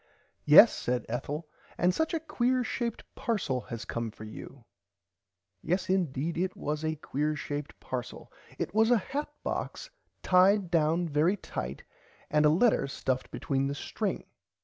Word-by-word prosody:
Yes - - +9
said 125 -2 -2
Ethel 145 +7 -4 0.3
and 180 +1 +3
such 320 - 0
a - - 0
quear 255 -5 0
shaped 235 -1 -3
parcel 170 - -1
has 115 -1 -5
come 115 -1 -3
for 110 - -12
you 115 +3 -10 1.0
Yes 185 +2 0
indeed 170 -3 0
it 185 +1 -1
was 150 +1 -3
a 155 0 0
quear 150 0 -2
shape 145 0 -5
parcel 125 -2 -6 0.2
it 175 - -3
was 220 +1 +4
a 245 - +6
hat 285 +8 -4
box - - -4 0.3
tied 185 0 +4
down 165 +1 +2
very 160 +6 +2
tight 70 - -6 0.5
and 150 0 +5
a - - +6
letter 170 - +3
stuffed 130 -1 -2
between 135 -1 -1
the 140 - -3
string. - - -3
160 Hz, 150 wpm, -29 LUFS, 135-195 Hz, 1.0 s, Yes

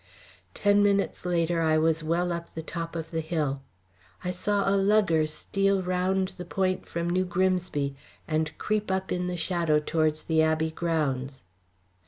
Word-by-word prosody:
Ten 205 0 +4
minutes 200 -2 +1
later 170 -1 +1
I 160 -1 +3
was 160 0 +2
well 170 +3 0
up 170 0 -5
the 160 - -4
top 165 +1 -5
of 160 -1 -5
the 165 - -1
hill. 150 -4 -1 0.6
I 180 - -1
saw 200 +2 0
a 195 - +3
lugger 195 -6 +3
steal 195 +4 0
round 185 +1 0
the - - -3
point 185 0 -1
from 170 0 -3
New 180 +2 +2
Grimsby 180 -6 0 0.3
and 155 0 -1
creep 215 -1 -1
up 190 0 -1
in 180 0 -1
the 180 0 -3
shadow 170 -3 +1
towards 155 0 0
the 160 -1 +2
Abbey 160 0 +1
grounds. 140 - -2
170 Hz, 165 wpm, -27 LUFS, 160-185 Hz, 0.6 s, Ten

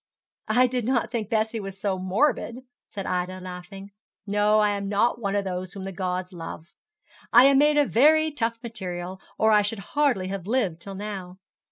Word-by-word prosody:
'I 250 +1 +4
did 250 -1 -1
not 240 -3 0
think 225 -4 -3
Bessie 220 0 0
was 195 -1 -7
so 195 -2 -1
morbid,' 235 +5 0 0.3
said 195 -2 -6
Ida, 180 +1 -2
laughing. 185 +2 -9 0.3
'No, 210 +1 +2
I 210 -1 +3
am 200 -1 -3
not 230 +4 +1
one 200 -2 -1
of 200 -1 0
those 185 -1 -4
whom 195 - -7
the 195 - -5
gods 185 0 -3
love. 165 0 -8 0.6
I 245 +3 +8
am 275 0 +6
made 295 +1 +4
of 290 -2 +3
very 310 +5 +5
tough 230 -5 -2
material, 185 -5 -6 0.2
or 220 0 +4
I 210 -1 +6
should 205 -1 -4
hardly 265 -11 +2
have 195 -2 -5
lived 205 -9 0
till 195 +1 -8
now. 190 -3 -6
205 Hz, 190 wpm, -25 LUFS, 185-235 Hz, 0.6 s, I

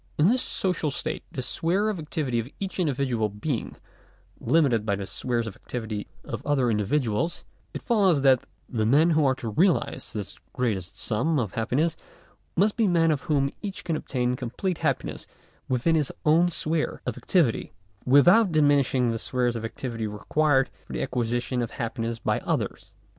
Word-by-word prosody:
In 155 +5 +5
this 250 +2 +2
social 180 -5 0
state 140 - -4
the 130 - -4
sphere 180 +10 0
of 210 -5 -1
activity 150 -6 -2
of 115 +3 -4
each 195 -1 -4
individual 130 -9 0
being 110 +5 -3 0.6
limited 140 -9 +3
by 100 -2 0
the 100 0 -5
spheres 120 +3 -2
of 110 - -6
activity 110 -4 -5 0.2
of - - -6
other 135 -5 +2
individuals, 115 - 0 0.3
it - - -7
follows 195 - +3
that 130 -3 +4 0.2
the 110 -4 -1
men 155 +8 +5
who 155 -1 +3
are 130 - +2
to 120 -3 -5
realize 155 - +1
this 105 -3 -6
greatest 110 -8 -2
sum 140 +9 0
of 110 -8 -1
happiness, 140 +9 0 0.6
must 205 +4 +2
be 225 -3 +3
men 165 -3 +3
of 150 - -2
whom 140 -2 +2
each 200 -2 -5
can 165 - -1
obtain 125 -4 -1
complete 130 +9 -3
happiness - - -2 0.4
within 130 +6 +2
his 150 -4 +1
own 165 +3 +5
sphere 160 -1 -1
of - - -2
activity, 160 -12 +1 0.3
without 175 - +6
diminish 145 -4 +3
ing 125 -2 +2
the 115 - -2
spheres 125 -1 0
of 115 - -4
activity 115 -1 -4
required 135 +6 +1 0.2
for - - -8
the - - -1
acquisition 120 +1 -1
of 120 - -2
hap 115 -1 -5
piness 115 0 -2
by - - +1
others. - - -3
135 Hz, 175 wpm, -26 LUFS, 115-160 Hz, 0.6 s, without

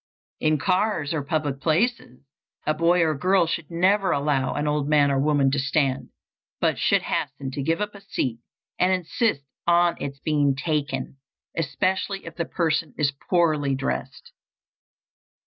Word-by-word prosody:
In 155 0 +2
cars 180 0 0
or 155 - -1
public 145 -1 -2
places, 165 - 0 0.4
a 155 - +2
boy 170 +3 +3
or 160 -1 +2
girl 180 +5 +3
should 165 -2 -3
never 190 +3 +2
allow 140 -2 0
an 145 - -1
old 150 -1 0
man 145 -2 +4
or 135 - +1
woman 140 -1 +3
to 145 - 0
stand, 135 -1 0 0.5
but - - +1
should - - +2
hasten 135 -1 -3
to 140 - -4
give 165 +7 0
up 210 0 -2
a 200 - -12
seat 120 -10 -3 0.4
and 180 +1 +3
insist 185 - 0 0.2
on 175 0 +4
its 140 0 -4
being 145 -1 +1
taken, 140 -2 -2 0.4
especially 190 +5 -1
if 165 -1 -9
the 170 - -2
person 160 -4 -1
is 145 -2 +1 0.2
poorly 155 -6 +2
dressed. 65 - -4
155 Hz, 155 wpm, -24 LUFS, 140-175 Hz, 0.5 s, man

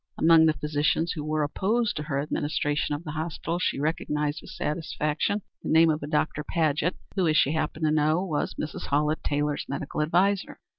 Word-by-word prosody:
Among 160 0 +6
the 155 - +4
physicians 150 +3 0
who 155 - -4
were 155 0 0
opposed 210 +9 0
to - - -2
her 145 -2 -2
administration 145 0 -1
of 150 - -7
the 155 - -5
hospital 160 +2 -3
she 180 - 0
recognized 150 -1 -1
with - - -12
satisfaction 155 +5 -2 0.2
the - - -5
name 160 0 +6
of 155 - -2
a 145 - -5
Dr. 150 0 0
Paget, 155 +2 0 0.2
who, 185 -3 +2
as 155 -1 +3
she 140 - +4
happened 160 0 -1
to 155 - +3
know, 155 +4 +2
was 155 -5 -2
Mrs. 155 - -5
Hallett 150 +2 +1
Taylor's 145 0 -1
medical 140 +2 -3
adviser. 185 +6 +1
155 Hz, 190 wpm, -26 LUFS, 150-165 Hz, 0.2 s, Among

